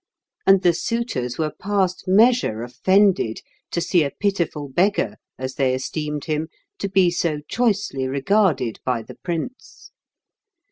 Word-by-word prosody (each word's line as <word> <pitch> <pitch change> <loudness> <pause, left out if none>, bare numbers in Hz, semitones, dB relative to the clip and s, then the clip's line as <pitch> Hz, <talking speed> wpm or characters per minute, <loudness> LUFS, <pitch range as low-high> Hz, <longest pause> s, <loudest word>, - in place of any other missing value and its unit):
And 195 0 +6
the 175 -1 +5
suitors 170 - -2
were 155 -1 -1
past 195 -2 -1
measure 205 - +3
offended 185 - +2 0.3
to - - -2
see 170 -1 +2
a 140 - -1
pitiful 170 -6 -2
beggar, 140 - +1 0.2
as 130 0 -4
they 130 -2 +1
esteemed 150 +2 -4
him, 155 0 -1 0.3
to 200 - -2
be 190 -2 +4
so 165 -3 -1
choicely 205 - 0
regarded 140 - +1
by 125 -3 -1
the - - -11
prince. 175 +9 -6
170 Hz, 135 wpm, -22 LUFS, 135-195 Hz, 0.3 s, And